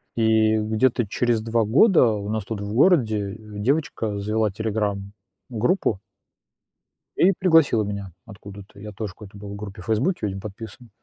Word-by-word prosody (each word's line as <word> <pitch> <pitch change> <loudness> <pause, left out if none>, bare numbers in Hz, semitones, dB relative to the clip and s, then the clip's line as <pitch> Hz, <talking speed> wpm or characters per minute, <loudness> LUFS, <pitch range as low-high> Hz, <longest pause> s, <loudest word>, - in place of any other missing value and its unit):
И 110 -1 +3
где-то 110 +2 +1
через 120 +1 0
2 115 0 0
года 145 - +5
у 100 0 -5
нас 110 -2 -2
тут 110 -3 -5
в 100 +1 -5
городе, 110 - +3
э, - - -8 0.2
девочка 115 -5 -1
завела 105 +1 0
"Телеграм"-группу. 105 - -2 1.2
И 190 - +5
пригласила 160 - +4
меня 100 -2 -5
откуда-то. 100 -1 -12
Я 105 +1 -8
тоже 105 -1 -6
в - - -22
какой-то 100 -1 -13
был 100 0 -8
группе 100 -3 -8
в - - -12
"Фейсбуке", 125 - 0
видимо, 95 -1 -4
подписан. 110 +3 -10
110 Hz, 150 wpm, -23 LUFS, 100-115 Hz, 1.2 s, года